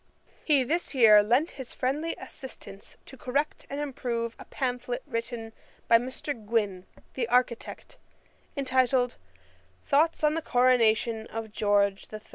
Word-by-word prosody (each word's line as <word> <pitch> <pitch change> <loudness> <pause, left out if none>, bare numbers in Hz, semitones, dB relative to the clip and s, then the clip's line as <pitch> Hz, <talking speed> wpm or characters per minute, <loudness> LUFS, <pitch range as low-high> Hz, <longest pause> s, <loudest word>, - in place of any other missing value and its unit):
] - - -31
He 280 -3 +5
this 320 +3 -2
year 215 -4 +8
lent 245 +10 +2
his 255 - -8
friendly 295 +6 -1
assistance 200 -6 -9
to - - -11
correct 280 +4 -2
and 280 - -4
improve 240 -5 -3
a - - -10
pamphlet 250 -2 -3
written 230 -3 -4 0.3
by 230 - +6
Mr. 260 +4 -4
Gwyn, 210 -5 -2 0.3
the 240 -3 -2
architect, 245 -1 -1 0.6
entitled, 255 -2 +1 0.7
Thoughts 310 +3 +2
on 300 0 +4
the 325 - -1
Coronation 230 -4 +2
of 225 -1 -6
George 205 -2 +1
III. 215 - -6
245 Hz, 135 wpm, -28 LUFS, 225-270 Hz, 0.7 s, year